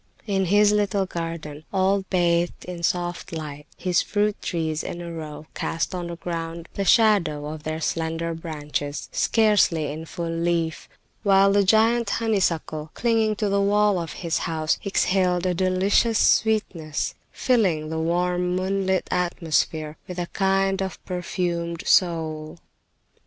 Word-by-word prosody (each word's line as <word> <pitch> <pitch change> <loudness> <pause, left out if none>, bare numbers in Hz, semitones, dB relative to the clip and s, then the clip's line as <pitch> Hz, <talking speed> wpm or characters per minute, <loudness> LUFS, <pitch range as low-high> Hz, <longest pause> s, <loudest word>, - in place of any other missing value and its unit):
In 195 -3 0
his 205 +3 +4
little 205 -2 +1
garden, 165 -4 -5
all 195 0 +2
bathed 175 -1 +1
in 180 -1 -6
soft 175 0 -2
light, 150 -3 -6
his 180 -2 +1
fruit 210 0 0
trees 160 -2 -2
in 175 - -5
a 170 -1 -6
row 155 -2 -7
cast 165 - -2
on 175 -1 -3
the 170 - -5
ground 165 -1 -5
the 200 - -2
shadow 195 -9 +4
of 155 +1 -6
their 155 +1 -4
slender 165 +1 -2
branches, 150 -3 -4
scarcely 205 -9 +2
in 160 +2 -7
full 170 0 -4
leaf, 165 -1 -1 0.3
while 195 0 +5
the 200 0 +4
giant 225 +3 +3
honeysuckle, 170 -9 0
clinging 225 -2 +2
to 210 +1 -1
the 200 0 +2
wall 205 -1 +3
of 165 -2 -5
his 170 -2 -2
house, 160 -1 0
exhaled 185 -2 +1
a 180 - +2
delicious 190 +5 +2
sweetness, 190 -11 +1 0.2
filling 185 -12 +1
the 160 0 -2
warm 180 +2 0
moonlit 190 0 0
atmosphere 160 -3 -1
with 180 - -7
a 175 - -1
kind 195 0 +1
of 190 0 -3
perfumed 175 -2 -3
soul. 160 -3 +1
175 Hz, 140 wpm, -24 LUFS, 165-195 Hz, 0.3 s, while